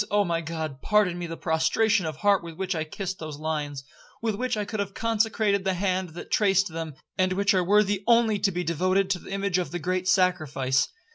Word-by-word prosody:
Oh 205 +1 +3
my 170 -2 -1
God, 160 -4 -5
pardon 205 -5 +2
me 175 - -4
the 165 0 -6
prostration 175 +4 +1
of 155 - -4
heart 200 +3 +2
with 165 -1 -8
which 190 +1 -2
I 160 -2 -2
kissed 190 +3 -5
those 155 -2 -6
lines, 150 -3 -3 0.4
with 225 -1 -1
which 250 +2 -2
I 210 - -1
could 215 +1 -5
have 200 -1 -3
consecrated 220 -3 +1
the 190 -1 0
hand 185 -2 -1
that - - -9
traced 195 -2 +3
them, 160 -2 -6 0.2
and 185 0 +2
which 200 +2 +2
are 185 -1 +2
worthy 205 +1 +2
only 230 -3 +4
to 195 - +2
be 180 0 -2
devoted 185 +4 +1
to 185 - 0
the - - -12
image 195 -1 0
of 180 - -2
the 175 - -4
great 185 +2 -2
Sacrifice. 155 -9 +2
185 Hz, 220 wpm, -26 LUFS, 165-200 Hz, 0.4 s, only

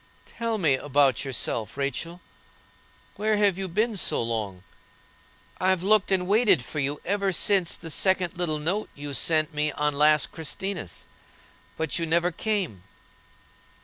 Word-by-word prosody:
"Tell 230 -1 -3
me 160 -8 +2
about 135 -1 +2
yourself, 115 -4 -1
Rachel. 160 +6 -4 1.0
Where 215 0 +1
have 205 -3 +3
you 190 - -3
been 215 +6 0
so 195 - +1
long? 105 -5 -4 1.0
I've 185 -1 +2
looked 210 0 +3
and 185 -1 +2
waited 200 - +3
for 150 +5 -5
you 140 +1 -2
ever 200 +1 0
since 185 0 +2
the 165 - -8
second 185 +1 +1
little 170 -3 -2
note 180 +8 -2
you 145 0 -6
sent 155 +3 +1
me 150 0 0
on 150 0 0
last 150 0 +3
Christinas; 165 - -5 0.7
but 160 -3 -2
you 165 - -2
never 170 +2 +2
came." 190 - -2
165 Hz, 145 wpm, -26 LUFS, 145-195 Hz, 1.0 s, have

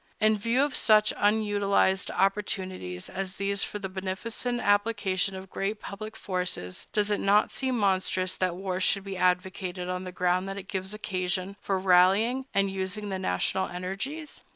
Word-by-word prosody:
In 215 0 +4
view 230 +6 +2
of 290 -2 -1
such 215 -1 +4
unutilized 205 -2 +2
opportunities 185 - -1
as 190 0 -4
these 200 +1 -1
for - - -4
the 200 -2 -4
beneficent 195 +6 -3
application 205 -3 +1
of 190 0 -9
great 205 +2 -2
public 215 +2 -7
forces, 180 - -3
does 210 0 +1
it 205 - +1
not 205 +1 +3
seem 260 -2 -1
monstrous 185 -2 +1
that 185 -2 0
war 185 0 -3
should 200 +1 +2
be 195 -1 -5
advocated 180 0 0
on 180 0 -2
the 185 - -6
ground 180 +1 +1
that 195 - -5
it 195 -1 -7
gives 190 0 -3
occasion 185 -2 -2
for 195 - 0
rallying 195 +8 +4
and 195 0 +2
using 195 +2 -3
the 190 -1 -2
national 185 - 0
energies? 195 - -5
195 Hz, 165 wpm, -28 LUFS, 185-210 Hz, -, In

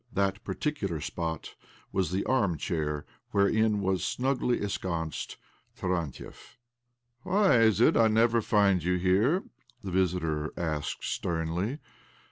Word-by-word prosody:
That 100 0 0
particular 100 - -2
spot 80 +1 -4 0.4
was 95 -4 0
the 95 +3 -1
arm 100 -11 +1
chair, 75 -4 -2 0.2
wherein 105 +1 +2
was 95 -1 0
snugly 125 -1 0
ensconced 85 -5 -3 0.4
Tarantiev. 90 - -4 0.3
" 120 0 -50
Why 190 - +3
is 110 -3 +4
it 120 - +5
I 115 - +5
never 115 +1 +3
find 100 -5 +3
you 90 +1 +1
here? 100 - +2 0.2
" 120 -2 -33
the 95 - -5
visitor 80 -4 0
asked 80 -3 -3
sternly. 85 - -2
95 Hz, 125 wpm, -29 LUFS, 85-115 Hz, 0.4 s, it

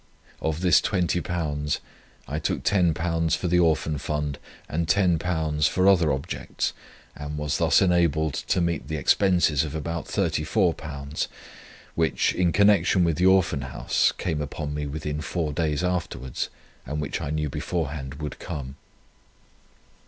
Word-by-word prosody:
"[Of 80 +1 -1
this 90 -4 +5
£20 85 -6 -1 0.5
I 75 +4 -2
took 75 - -2
£10 85 -3 +2
for 90 - -2
the 90 +1 +3
Orphan 80 -3 +2
fund, 75 -1 -3 0.3
and 80 +1 -2
£10 80 -4 +2
for - - -8
trip - - +5
other 85 -6 +3
objects, 70 0 -3 0.4
and 75 0 -6
was 75 -1 -1
thus - - +4
enabled 85 -4 +2
to 90 - 0
meet 85 -1 -1
the 80 - -3
expenses 80 -1 +3
of 75 -1 -5
about 85 +2 -3
£34 75 -4 -1 0.7
which, 80 -1 +1
in 90 -2 +2
connection 100 -1 +4
with 85 -3 +1
the 90 - +4
Orphan 95 -6 +3
Houses, 65 -2 +1
came 80 -4 -2
upon 75 0 -4
me 75 0 -3
within 75 +1 -4
four 80 -2 -2
days 75 -1 0
afterwards, 85 -8 -2 0.3
and 75 +1 -4
which 75 - -3
I - - -3
knew 75 -1 -1
beforehand 75 -5 -3
would 75 -2 -6
come. 70 -5 -6
80 Hz, 145 wpm, -25 LUFS, 75-85 Hz, 0.7 s, this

